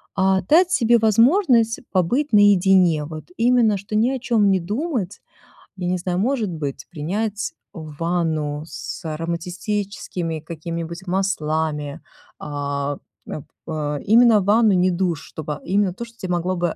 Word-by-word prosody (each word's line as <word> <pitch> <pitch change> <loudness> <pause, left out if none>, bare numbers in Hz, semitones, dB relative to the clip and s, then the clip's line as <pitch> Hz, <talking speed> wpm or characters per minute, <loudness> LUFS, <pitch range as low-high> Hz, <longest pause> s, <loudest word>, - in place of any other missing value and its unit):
а, 190 0 +2
дать 340 - +4
себе 235 -8 +4
возможность 230 - +3
побыть 235 - +1
наедине. 190 -6 +5
Вот 155 0 -8
именно 235 -3 +3
что 200 +2 -6
ни 225 +3 +3
о 265 -1 -2
чём 225 -5 +2
не 190 - +3
думать. 210 - -3 0.6
Я 180 -1 -3
не 185 - 0
знаю, 180 0 -2
может 230 -2 0
быть, 145 -5 -5
принять 200 +7 -3 0.2
ванну 155 -2 -2
с - - -7
ароматическими 170 +1 -3
какими-нибудь 170 +2 -6
маслами, 155 -6 -1 0.4
а, 145 -1 -3 0.3
э 155 - -5 0.3
э. 150 -2 -2
Именно 225 0 +6
ванну, 210 +2 +4
не 185 0 +3
душ, 175 -3 -1
чтобы 150 -1 -6
именно 195 -1 +1
то, 235 - -7
что 230 0 -18
тебе 185 -4 -5
могло 175 +2 -1
бы 175 -2 -1
185 Hz, 140 wpm, -21 LUFS, 160-215 Hz, 0.6 s, Именно